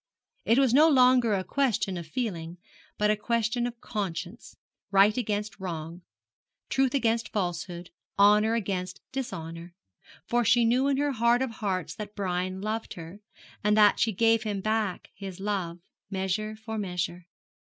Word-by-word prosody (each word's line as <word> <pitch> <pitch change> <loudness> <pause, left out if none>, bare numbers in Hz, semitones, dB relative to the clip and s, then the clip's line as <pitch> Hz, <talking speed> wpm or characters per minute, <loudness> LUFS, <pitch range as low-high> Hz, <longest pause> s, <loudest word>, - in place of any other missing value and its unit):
It 230 - +4
was 265 -3 +4
no 305 +4 +7
longer 250 -5 +5
a 190 - -1
question 215 -7 0
of 170 -2 -6
feeling, 175 -5 -4 0.4
but 210 0 +3
a - - +2
question 235 +2 0
of 240 -1 -8
conscience 190 0 -5 0.3
right 200 +2 +5
against 210 -4 -2
wrong, 170 -2 -6 0.7
truth 270 0 +1
against 230 -3 +1
falsehood, 175 -2 -3 0.3
honour 210 +2 +5
against 185 -4 -3
dishonour; 170 -10 -6 0.5
for 240 +4 +1
she 235 +1 +4
knew 250 +4 +3
in 275 -1 +2
her 290 0 +1
heart 235 +1 +3
of 260 - -3
hearts 195 -5 -3
that 210 -1 -8
Brian 185 -1 -2
loved 220 +1 -3
her, 170 +3 -9 0.4
and 210 +1 +3
that 210 -1 +6
she 225 - +2
gave 225 +2 +3
him 210 -2 -2
back 215 -2 -2
his 190 -2 -8
love, 190 -4 -2 0.3
measure 195 +3 -2
for 220 0 -6
measure. 180 -2 -3
210 Hz, 155 wpm, -28 LUFS, 185-235 Hz, 0.7 s, no